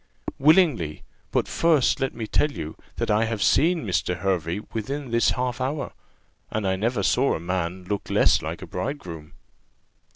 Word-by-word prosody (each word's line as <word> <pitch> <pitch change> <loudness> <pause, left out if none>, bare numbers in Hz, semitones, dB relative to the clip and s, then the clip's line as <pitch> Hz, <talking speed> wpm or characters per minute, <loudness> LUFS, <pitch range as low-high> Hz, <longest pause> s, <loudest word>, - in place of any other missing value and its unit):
"Willingly. 145 - +3 0.3
But - - +1
first 155 -4 +2
let 135 -1 -1
me 115 -1 -4
tell 150 +7 +1
you, 80 - -6 0.2
that - - -1
I 110 +2 +3
have 110 -3 -1
seen 165 - +3
Mr. 90 -2 0
Hervey 90 0 -1
within 130 +4 -4
this 115 0 +3
half 125 0 -2
hour, 140 +3 -2 0.6
and 110 -2 -2
I 95 - +2
never 110 +2 -1
saw 135 +7 +2
a - - -4
man 90 +1 -3
look 100 +2 -4
less - - +4
like - - -5
a - - -5
bridegroom." 90 - -5
110 Hz, 165 wpm, -25 LUFS, 90-135 Hz, 0.6 s, less